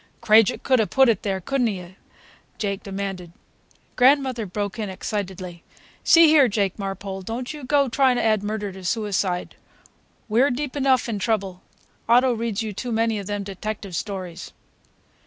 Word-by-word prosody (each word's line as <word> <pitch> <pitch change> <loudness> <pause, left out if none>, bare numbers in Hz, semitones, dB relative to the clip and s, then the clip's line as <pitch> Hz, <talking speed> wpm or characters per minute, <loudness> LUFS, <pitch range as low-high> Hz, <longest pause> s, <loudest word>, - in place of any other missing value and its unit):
"Krajiek 215 -1 +4
could 260 -2 +3
'a' 220 - +2
put 265 -2 +4
it 220 -5 +1
there, 195 -2 -2
could 275 +8 -2
n't 240 - +3
he?" 180 -2 -7 0.6
Jake 200 -2 -2
demanded. 195 -4 -5 0.6
Grandmother 255 -3 +3
broke 205 +4 -4
in 210 -2 -3
excitedly: 185 -3 -5 0.4
"See 330 0 +7
here, 300 -4 +6
Jake 200 -2 -1
Marpole, 195 0 -5
don't 235 +8 -5
you 300 -2 -9
go 280 +1 +2
trying 260 0 +3
to - - 0
add 215 -2 +2
murder 205 -1 -3
to 190 0 -11
suicide. 190 -2 -2 0.7
We're 235 +6 +3
deep 265 +2 -3
enough 265 -4 +2
in 220 -3 -3
trouble. 195 -4 -2 0.5
Otto 250 +2 +5
reads 225 -2 -2
you 215 -2 -4
too 245 +5 -5
many 225 -1 +1
of 195 - -7
them 205 -1 -3
detective 200 -1 -6
stories." 185 -4 -6
210 Hz, 165 wpm, -23 LUFS, 195-245 Hz, 0.7 s, See